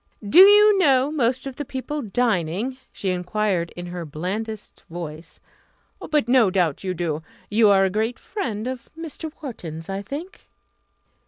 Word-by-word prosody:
"Do 310 - +6
you 410 +1 +8
know 275 -4 +4
most 255 -3 0
of 270 -2 -6
the 290 - -3
people 285 +2 -4
dining?" 220 - -1
she 195 - -3
enquired 180 -1 -1
in 175 - -6
her 175 0 -6
blandest 195 +8 -5
voice. 165 -1 -8 0.7
"But 300 -6 +2
no 245 -5 +5
doubt 180 -5 0
you 185 -1 -2
do. 160 -3 -2 0.3
You 215 0 +5
are 195 -1 +5
a 190 - 0
great 220 +5 -1
friend 225 - -4
of 255 -1 -5
Mr. 320 -1 -6
Wharton's, 165 - -7
I 195 +1 -3
think?" 300 - -8
215 Hz, 155 wpm, -23 LUFS, 180-265 Hz, 0.7 s, you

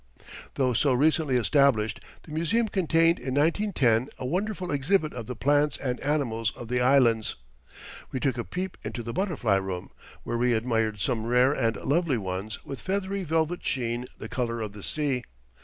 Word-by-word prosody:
Though 130 -2 +2
so 135 +3 +3
recently 150 0 +3
established, 125 -3 +3 0.2
the 160 - -13
museum 170 +9 +1
contained 165 -3 +3
in 130 +1 -3
1910 145 - +2
a - - -5
wonderful 185 +5 -2
exhibit 155 +3 +1
of 120 -3 -6
the 125 - -4
plants 145 +4 +2
and 125 -2 -3
animals 120 -7 0
of 120 - -9
the 125 0 +1
Islands. 125 -4 +3 0.8
We 130 - -2
took 130 -2 0
a - - -1
peep 185 +6 -5
into 120 - -5
the 115 +1 -5
butterfly 150 - +1
room, 95 -2 -4 0.3
where 120 - -2
we 125 0 +3
admired 110 -2 0
some 115 -1 0
rare 125 +3 +4
and 115 -5 0
lovely 150 -2 +1
ones 95 +1 -5
with 135 - -6
a - - -11
feathery 195 0 -2
velvet 160 +1 0
sheen 120 -1 -2
the - - -7
colour 120 -2 -2
of 105 -2 -4
the 105 - -10
sea. 140 +1 -1
130 Hz, 175 wpm, -27 LUFS, 115-160 Hz, 0.8 s, rare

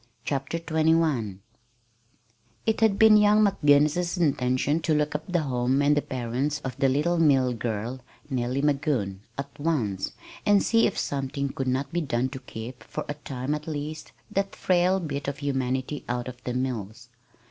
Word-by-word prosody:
CHAPTER 135 +3 -2
XXI 160 - +1 1.3
It 220 0 +1
had 215 -3 +4
been 220 0 +7
young 210 0 +5
McGinnis's 160 -1 +3
intention 145 -2 +1
to 160 -1 +1
look 150 0 +1
up 155 +4 -4
the 175 -2 +2
home 130 -1 +1
and 145 +1 +4
the 145 - +2
parents 130 +4 -2
of 130 -3 -5
the 135 -1 +3
little 160 +6 +1
mill 135 -6 +4
girl, 115 +2 -3 0.3
Nellie 130 0 -1
Magoon, 135 -10 0 0.2
at 140 +1 -7
once, 125 - -1 0.3
and 205 -1 +4
see 230 0 +4
if - - -4
something 140 0 -2
could 135 0 -4
not 130 +5 -1
be 175 - +1
done 130 -3 0
to 130 0 -7
keep 120 -1 -8
for - - -5
a 145 - -2
time, 140 -1 -4
at 150 +1 -5
least 155 0 -5 0.2
that 195 0 -1
frail 185 +1 +2
bit 145 -5 -4
of 140 0 -2
humanity 135 0 -2
out 120 0 -2
of 125 0 -9
the 125 - -2
mills. 120 -2 -4
140 Hz, 170 wpm, -26 LUFS, 125-160 Hz, 1.3 s, been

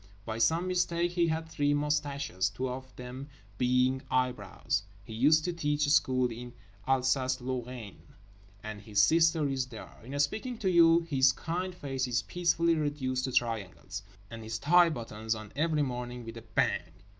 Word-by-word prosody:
By 110 0 -4
some 165 +10 +2
mistake 175 -1 +1
he 175 -1 +2
had 160 0 -2
three 145 -2 +1
moustaches, 145 - -1
two 125 +7 -3
of 130 +1 -6
them 125 +3 -8 0.3
being 125 +1 +2
eyebrows. 125 -6 -1 0.2
He 110 - -10
used 150 +7 +4
to 175 - -1
teach 150 -2 0
school 130 -4 +3
in 120 +1 -8 0.3
Alsace 130 0 +2
Lorraine, 125 -4 -5 0.6
and 105 -1 -6
his 105 0 -1
sister 160 +6 +4
is 135 -2 -1
there. 115 -3 -10
In 135 +4 -5
speaking 220 - -1
to 190 -4 0
you 170 -1 +6
his 135 -5 +3
kind 175 +6 -4
face 135 -5 -3
is 120 -1 0
peacefully 170 -1 +1
reduced 145 -5 -1
to 130 - -3
triangles. 110 -4 -2 0.3
And 115 0 -7
his 110 0 -4
tie 175 +7 +5
buttons 110 -5 -3
on 110 -2 -9
every 155 0 +1
morning 125 -2 -5
with 115 0 -8
a - - -7
Bang! 115 0 -1
130 Hz, 165 wpm, -30 LUFS, 120-160 Hz, 0.6 s, you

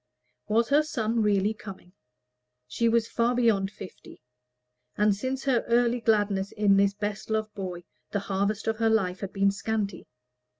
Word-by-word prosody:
Was 225 +2 +2
her 290 +2 +5
son 230 -7 -1
really 205 0 +2
coming? 190 -4 -11 0.7
She 230 - 0
was 230 0 +2
far 235 +1 0
beyond 220 -5 +2
fifty; 195 -2 -12 0.8
and 210 -1 +3
since 260 +5 -3
her 260 -4 +1
early 240 0 +2
gladness 205 -3 +1
in 205 -2 +3
this 200 0 +3
best 210 +1 -4
loved 215 -1 -1
boy, 185 -3 -6 0.3
the 205 - -2
harvest 200 +2 -1
of 220 0 -1
her 225 0 +2
life 190 -5 +1
had 195 - -5
been 195 0 +2
scanty. 205 0 -3
210 Hz, 160 wpm, -27 LUFS, 200-230 Hz, 0.8 s, her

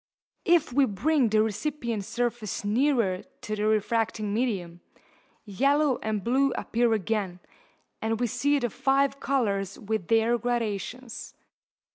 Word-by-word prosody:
If 335 -6 +3
we 275 +1 +5
bring 260 +4 +1
the 215 0 +4
recipient 225 -1 -2
surface 235 -4 -2
nearer 230 -4 +2 0.2
to 215 - -3
the 210 0 0
refracting 215 -1 0
medium, 190 -8 -2 0.6
yellow 275 +6 +2
and 215 -2 -2
blue 270 +3 +2
appear 235 0 0
again, 200 -3 -1 0.6
and 225 0 -1
we 245 - +2
see 260 +5 +1
the 240 -5 -1
five 275 +2 +1
colours 200 -8 0
with 215 -5 -3
their 230 +1 +3
gradations. 235 +1 -3
230 Hz, 125 wpm, -27 LUFS, 210-260 Hz, 0.6 s, we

